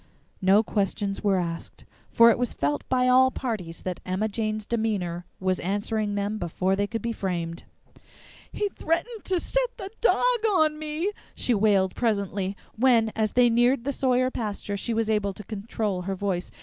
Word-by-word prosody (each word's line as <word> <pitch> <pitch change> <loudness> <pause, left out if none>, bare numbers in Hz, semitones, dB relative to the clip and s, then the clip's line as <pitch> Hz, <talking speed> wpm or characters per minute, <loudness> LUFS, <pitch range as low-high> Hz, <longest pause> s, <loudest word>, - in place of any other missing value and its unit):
No 195 +3 +5
questions 200 -1 -2
were 200 -2 +3
asked, 170 -2 -5 0.2
for 230 0 +7
it 230 - 0
was 245 -2 -1
felt 145 0 -1
by 255 -1 +2
all 260 +1 +6
parties 215 -11 -5
that 185 -1 -3
Emma 185 +4 -1
Jane's 215 0 -2
demeanor 200 -7 -2
was 185 -1 0
answering 205 +2 -1
them 205 +1 -2
before 185 +2 0
they 205 +1 0
could 225 0 -4
be 235 - -1
framed. 170 -5 -3 0.9
"He 415 - -1
threatened 395 +7 -2
to 370 -2 +1
set - - -1
the 385 0 -7
dog 480 - +3 0.2
on 310 -6 +2
me!" 310 +6 -2 0.2
she 245 - +1
wailed 200 -3 +3
presently, 200 -4 -1 0.2
when, 230 -2 +4
as 215 -2 0
they 245 -1 +5
neared 240 +2 +3
the 280 +2 -1
Sawyer 255 -1 +2
pasture, 205 -3 -3
she 225 +3 -2
was 225 -1 +1
able 210 -2 0
to 210 - -9
control 205 -2 -3
her 195 +2 -3
voice. 185 -2 -2
215 Hz, 175 wpm, -26 LUFS, 195-250 Hz, 0.9 s, for